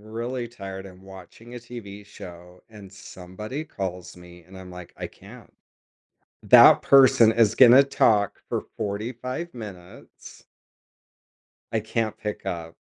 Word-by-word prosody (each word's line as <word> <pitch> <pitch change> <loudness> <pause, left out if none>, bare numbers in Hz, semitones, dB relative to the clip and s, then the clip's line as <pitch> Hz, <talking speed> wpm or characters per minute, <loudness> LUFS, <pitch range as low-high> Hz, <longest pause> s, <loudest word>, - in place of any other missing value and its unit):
really 120 +3 -6
tired, 95 -4 -9
I'm 95 -1 -15
watching 95 +5 -14
a 125 - -7
TV 105 -4 -11
show, 90 -2 -13
and 105 -3 -13
somebody 100 - -9
calls 90 - -7
me, 90 -1 -16
and 95 +1 -16
I'm, 95 -1 -12
like, 90 -1 -12
"I - - -6
can't." - - -16 0.9
That - - +7
person 130 -5 +5
is 110 -2 +2
gonna 130 +1 +7
talk 105 -7 +1
for - - -2 0.2
45 120 +10 -5
minutes. 95 -6 -13 1.3
I 110 - 0
can't 110 0 -3
pick 105 -2 -6
up. 85 -3 -6
105 Hz, 130 wpm, -24 LUFS, 95-120 Hz, 1.3 s, That